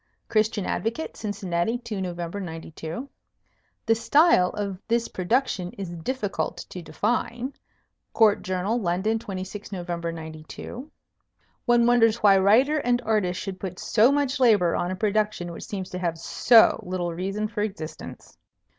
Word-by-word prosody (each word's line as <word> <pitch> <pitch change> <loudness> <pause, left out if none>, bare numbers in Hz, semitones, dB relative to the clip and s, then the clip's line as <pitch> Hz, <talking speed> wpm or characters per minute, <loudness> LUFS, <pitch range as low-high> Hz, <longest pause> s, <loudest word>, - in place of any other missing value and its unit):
Christian 215 -2 +1
Advocate, 235 +9 -2
Cincinnati, 205 0 -2
2 235 -5 -5
Nov. 180 -2 -4
'92. 165 - -6 0.8
"The 225 - +4
style 230 - +4
of 200 -3 -4
this 235 0 +1
production 185 -2 -1
is 190 -3 -6
difficult 205 +5 -3
to 180 - -7
define." 240 - -2 0.6
Court 220 -3 +4
Journal, 185 +6 -1
London, 190 +5 0
26 195 0 -7
Nov. 180 -2 -5
'92. 165 - -6 0.8
"One 240 -1 +4
wonders 230 -2 +5
why 205 -4 +5
writer 250 +11 +4
and 245 -3 +1
artist 210 -5 0
should 190 -1 -5
put 185 -2 -5
so 230 +7 +4
much 285 -1 0
labor 210 -9 +4
on 175 - -1
a 185 - -2
production 210 -3 0
which 170 - -8
seems 190 -3 -5
to 180 - -4
have 170 -2 -1
so 225 +7 +5
little 180 -1 -3
reason 195 +5 -2
for 210 -1 -4
existence." 195 -7 -6
205 Hz, 140 wpm, -25 LUFS, 180-230 Hz, 0.8 s, wonders